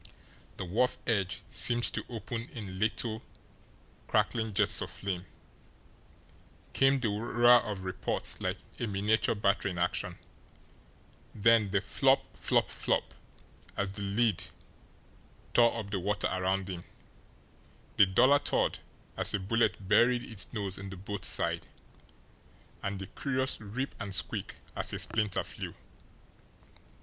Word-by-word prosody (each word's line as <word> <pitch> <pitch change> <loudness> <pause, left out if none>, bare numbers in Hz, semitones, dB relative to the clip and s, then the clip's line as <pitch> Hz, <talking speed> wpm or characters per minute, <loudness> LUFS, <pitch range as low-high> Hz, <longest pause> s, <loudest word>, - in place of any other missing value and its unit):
The 95 - -4
wharf 115 +8 +1
edge 100 -5 0
seemed 120 -1 +3
to - - -2
open 115 +1 -5
in 95 -5 -6
little, 110 +1 0 0.9
crackling 110 -1 +1
jets - - +3
of - - -3
flame, 95 -2 -4 1.5
came 135 0 +4
the 120 -4 0
roar 120 +3 +5
of 100 -3 -5
reports 95 +2 -2
like - - -1 0.2
a 120 - -1
miniature 105 +3 +1
battery 100 -1 +1
in 90 - -5
action, 90 +1 -1 1.2
then 110 -1 +4
the 100 0 +1
FLOP, 135 +5 +2
FLOP, - - +2
FLOP, - - -1 0.6
as 100 -1 0
the 100 - -6
lead 100 0 +1 1.1
tore 120 -1 +5
up 105 -3 -5
the 100 - -1
water 105 +3 0
around 95 +1 0
him, 90 -2 -6 1.1
the 100 - +7
duller 130 +9 +5
thud - - 0 0.4
as - - +2
a - - 0
bullet 105 -1 0
buried 120 +4 +4
its 110 -7 -2
nose 100 -4 -2
in 100 0 -7
the 95 - -8
boat's 100 +1 0
side, - - +1 1.1
and 100 0 -3
the 95 - -6
curious 130 +2 -2
rip 115 +6 -4
and 100 -2 -1
squeak - - +1 0.2
as - - +1
a - - -1
splinter 110 -3 0
flew. - - -7
105 Hz, 135 wpm, -30 LUFS, 95-115 Hz, 1.5 s, the